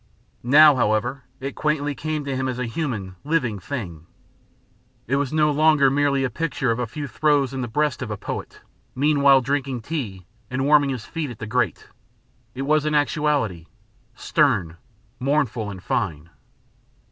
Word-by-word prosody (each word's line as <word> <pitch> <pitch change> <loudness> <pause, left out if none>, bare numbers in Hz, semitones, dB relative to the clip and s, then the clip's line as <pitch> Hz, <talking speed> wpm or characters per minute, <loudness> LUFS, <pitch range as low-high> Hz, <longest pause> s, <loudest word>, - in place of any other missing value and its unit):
Now, 145 +4 +7
however, 120 +3 0
it 135 +1 -5
quaintly 150 -1 -1
came 155 0 -3
to 140 -1 -2
him 130 0 -1
as 130 -1 -3
a 125 - -2
human, 115 - -4
living 135 -9 0
thing. 90 - -6 1.0
It 135 +4 0
was 140 -2 -1
no 155 -1 +3
longer 150 -2 +4
merely 140 -1 +2
a 130 - 0
picture 150 -6 -1
of 115 - -1
a 120 - -1
few 145 +6 -6
throes 140 -1 +1
in 135 - -3
the 120 - -3
breast 150 +3 -1
of 125 - -4
a 105 - -4
poet, - - -6 0.3
meanwhile 140 -1 +4
drinking 135 -2 -2
tea 110 - -5 0.2
and 130 +1 -1
warming 145 -1 +5
his 125 -4 -4
feet 160 -3 -4
at 120 - -8
the 110 - -6
grate; 120 +3 -1 0.7
it 135 - -3
was 150 +1 +2
an 155 0 0
actuality 145 - 0 0.5
stern, 90 - +1 0.4
mournful, 130 -5 0
and 95 -2 -9
fine. 85 -7 -2
135 Hz, 165 wpm, -23 LUFS, 115-145 Hz, 1.0 s, Now